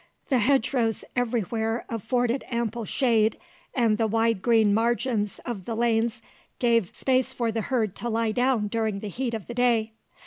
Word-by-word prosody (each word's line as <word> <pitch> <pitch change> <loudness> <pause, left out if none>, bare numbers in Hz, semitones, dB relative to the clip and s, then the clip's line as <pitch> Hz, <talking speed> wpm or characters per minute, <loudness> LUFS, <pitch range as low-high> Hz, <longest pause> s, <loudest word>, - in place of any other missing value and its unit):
The 260 -3 +3
hedge 265 +3 +2
rows 225 -4 0
every 245 -2 +1
where 225 +3 -2
afforded 245 +3 -1
ample 235 -1 -2
shade, 225 -3 +2 0.4
and 230 -4 +2
the 225 - +2
wide 225 -1 +1
green 225 -3 +4
margins 230 -1 0
of 210 -7 -5
the 230 - -3
lanes 230 -1 +1 0.3
gave 230 -6 +1
space 260 -1 +1
for 235 -2 -1
the 225 0 -2
herd 225 -6 -1
to 240 - -3
lie 225 0 0
down 245 -2 +1
during 220 -2 -1
the 210 - -5
heat 235 +3 -3
of 220 - -6
the 240 - -7
day. 235 -2 +2
230 Hz, 175 wpm, -26 LUFS, 220-245 Hz, 0.4 s, green